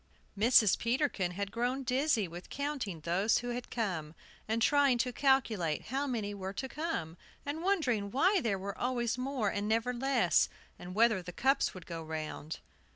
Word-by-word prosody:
Mrs. 215 -1 +5
Peterkin 235 - 0
had 200 +1 -3
grown 245 +4 -1
dizzy 255 -4 +1
with 175 +2 -10
counting 275 - -3
those 185 +7 +2
who 245 - -3
had 245 0 -4
come, 170 -9 -3 0.3
and 220 +1 0
trying 280 +1 +4
to 245 +1 -1
calculate 230 - +2
how 275 +3 -1
many 215 -6 -2
were 190 -1 -5
to 265 +6 -4
come, 270 - -4 0.3
and 290 +3 -3
wondering 275 - +1
why 365 - +3
there 215 -6 0
were 195 +1 -5
always 240 -2 -1
more 255 -5 -1
and 205 +1 -2
never 225 +3 +1
less, 240 - +2 0.3
and 180 +1 -8
whether 220 -3 +4
the 180 0 -8
cups 270 +5 +1
would 180 -2 -9
go 165 -1 -6
round. 155 -1 -5
230 Hz, 170 wpm, -32 LUFS, 190-265 Hz, 0.3 s, Mrs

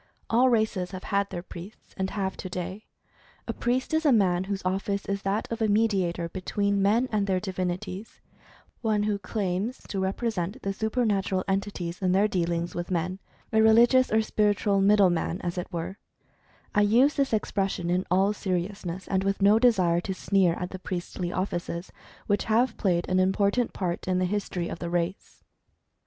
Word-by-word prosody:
All 250 +3 +5
races 215 -6 +1
have 185 - -6
had 200 0 0
their 175 - -5
priests, 185 +3 -11
and 190 0 -2
have 190 -2 -2
to 185 - -6
day. 185 +4 -5 0.6
A - - -2
priest 255 +4 -1
is 315 +1 +2
a 295 - +4
man 190 -5 +3
whose 195 -1 -4
office 195 +2 -1
is 200 0 -2
that 200 +3 -1
of 230 0 -3
a 220 - +3
medi 210 -2 +2
ator 170 0 -4
between 200 +2 0
men 220 +6 +3
and 205 -2 +1
their 190 -1 +1
divinities 185 +1 -4 0.3
— - - -24 0.3
one 215 -2 +1
who 210 -1 0
claims 200 +3 -2
to 195 - -2
represent 195 +1 -2
the 195 - -1
supernatural 210 -4 0
entities 195 -3 -2
in 185 -1 +2
their 200 +3 +4
dealings 170 -3 -1
with 175 0 -4
men 180 +1 -1 0.2
— - - -32
a 220 - +5
religious, 235 +4 +5
or 220 +1 +3
spiritual 205 -2 +1
"middle 200 -2 +5
man," 175 +1 -1
as 175 -1 -3
it 180 +1 -5
were 175 +3 -5 0.7
(I 205 - +4
use 240 +8 +4
this 275 -1 0
expression 195 -5 -1
in 180 +1 +1
all 190 +3 +3
seriousness, 185 -1 -3
and 190 -1 0
with 195 0 0
no 205 +2 +5
desire 185 -8 +3
to 190 +1 -4
sneer 185 -3 +2
at 180 - -5
the 185 - -6
priestly 175 -1 -4
offices, 175 -2 -3 0.3
which 205 -1 0
have 230 +2 +2
played 175 -3 0
an 185 0 +2
important 200 +5 +2
part 180 -2 -3
in 185 -1 +1
the 185 - +1
history 180 -2 -2
of - - -6
the 170 - -4
race). 175 +2 -3
195 Hz, 185 wpm, -27 LUFS, 180-210 Hz, 0.7 s, All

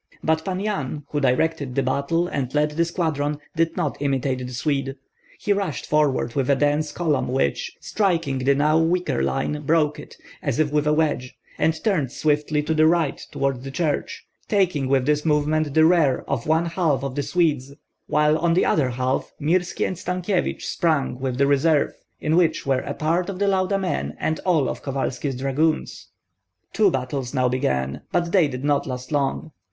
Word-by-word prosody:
But 160 0 +1
Pan 185 0 -3
Yan, 155 -9 -3
who 150 - 0
directed 135 0 0
the 135 - +2
battle 140 +6 0
and 135 -7 -3
led 150 0 +2
the 170 +3 +1
squadron, 155 -4 -1 0.2
did 165 0 0
not 155 -6 -1
imitate 135 -2 0
the 125 0 -6
Swede; 135 +1 -1 0.4
he 205 - +1
rushed 195 -9 -3
forward 145 -5 +1
with 135 -2 -1
a 140 - +5
dense 145 +2 +1
column 150 -6 0
which, 125 - -1
striking 165 -10 0
the 135 +2 +2
now 150 +3 +3
weaker 170 - +1
line, 70 - -1
broke 150 0 +1
it, - - -12 0.2
as 140 -5 -1
if 155 -2 +1
with 150 0 +1
a - - +4
wedge, 150 -5 -1 0.2
and 160 0 +1
turned 175 - +1
swiftly 150 0 0
to 155 +2 0
the 155 0 +4
right 165 -3 +1
toward 135 -2 -1
the 135 - -6
church, 170 - -2 0.2
taking 180 - +1
with 130 -1 +2
this 150 +1 +1
movement 150 -1 +1
the 160 0 +6
rear 160 -6 +3
of 115 - -2
one 160 +2 +2
half 165 -6 0
of 135 -2 -3
the 145 - -1
Swedes, 145 -5 0 0.3
while 150 +1 +3
on 170 0 +2
the 185 - +3
other 140 -5 +2
half 130 +2 -1
Mirski 175 +4 0
and 185 - -4
Stankyevich 180 +1 -1
sprang 145 -7 0
with 130 -2 -2
the 140 - +3
reserve 145 +2 +2 0.3
in 155 +1 0
which 175 -2 +2
were 135 -2 +1
a - - -3
part 170 +4 0
of 195 - -4
the 200 +1 +1
Lauda 190 0 +1
men 190 -2 -2
and 160 0 -1
all 160 -7 +3
of - - -4
Kovalski's 135 0 -2
dragoons. 140 +5 -1 0.7
Two 215 -2 +4
battles 130 -2 -3
now 130 -1 +3
began; 65 - -1
but 170 -1 0
they 180 -5 +4
did 130 -1 -6
not 145 -1 +1
last 125 +1 -6
long. 145 +2 -1
150 Hz, 190 wpm, -23 LUFS, 135-165 Hz, 0.7 s, the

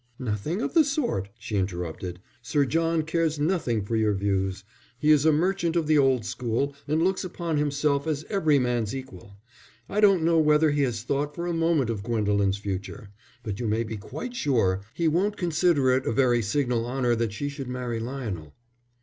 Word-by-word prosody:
"Nothing 130 - -2
of - - -3
the 330 -2 +6
sort," 270 - -1
she 105 -1 -4
interrupted. 90 -1 -3 0.2
"Sir 140 +5 +1
John 165 +2 +1
cares 160 -1 0
nothing 145 - 0
for 115 - -2
your 110 -2 +2
views. 95 -1 -1 0.3
He 150 +4 +3
is 150 0 +5
a - - +6
merchant 170 +2 +1
of 170 -2 +1
the 155 -1 +4
old 130 -5 +3
school, 120 +8 -2
and 155 +3 +1
looks 190 +1 +1
upon 170 -3 -3
himself 145 0 0
as 155 -1 -2
every 160 -8 +2
man's 125 -2 0
equal. 125 -7 -9 0.5
I 205 - -2
don't 195 -5 +5
know 165 0 +4
whether 150 0 +4
he 145 0 +1
has 120 -5 -1
thought 145 +3 -2
for 170 - -4
a 175 - -1
moment 165 -7 +1
of 105 -3 -4
Gwendolen's 100 -3 +1
future, 100 0 -5 0.3
but 105 -1 -4
you 120 - -2
may 110 +2 +1
be 110 0 -5
quite 155 - -7
sure 110 - +1
he 170 - +1
won't 190 +6 +1
consider 165 -6 +2
it 130 +1 +1
a - - +2
very 120 0 +3
signal 120 +1 0
honour 125 -1 +1
that 115 -1 -1
she 105 +8 -4
should 140 -2 -6
marry 125 -2 -3
Lionel." 110 - -5
135 Hz, 190 wpm, -26 LUFS, 110-160 Hz, 0.5 s, the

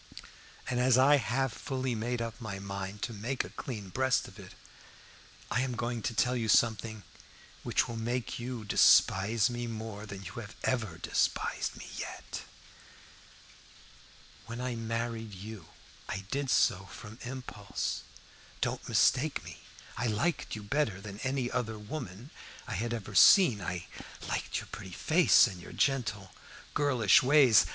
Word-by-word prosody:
And 125 -1 0
as 125 0 +5
I 140 +3 +6
have 135 -1 0
fully 130 -2 -3
made 115 +2 -2
up 115 +1 -7
my 105 -4 -5
mind 100 +1 -5
to 115 - -3
make 120 +6 -2
a - - -10
clean 105 -7 -6
breast 130 +5 +1
of - - -14
it, - - -12 1.0
I 125 - +2
am 130 -1 -1
going 120 0 -2
to 115 - -2
tell 125 +3 +2
you 115 -2 -1
something 110 -1 +2 0.6
which - - +1
will 115 - -5
make 120 +2 -2
you 120 -2 -5
despise 105 +2 +5
me 120 -1 -3
more 110 -2 -6
than 100 -1 -8
you 100 +6 -7 0.2
ever 110 -10 -1
despised 85 - -1
me - - -9
yet. - - -6 2.1
When 120 +1 -6
I 125 0 -2
married 115 -1 -3
you 100 -2 -9 0.4
I 100 - -3
did 140 -1 -1
so 95 -4 +3
from 105 +3 -11
impulse. 120 -5 -4 0.6
Don't - - -2
mistake 145 +3 +3
me. - - -10 0.4
I 120 +3 0
liked 125 +9 -1
you 105 - -7
better 110 -4 0
than 100 0 -8
any 130 -1 -1
other 115 -3 -2
woman 110 0 -7 0.4
I - - -4
had 115 +5 -2
ever 105 -3 -5
seen. 115 - +7
I 90 0 -4 0.4
liked - - -2
your - - -12
pretty 95 - -8
face, 165 - +5
and 95 -7 -6
your - - -10
gentle, 105 -8 0 0.4
girlish 125 -9 +4
ways. 130 -5 +6
115 Hz, 150 wpm, -31 LUFS, 105-125 Hz, 2.1 s, seen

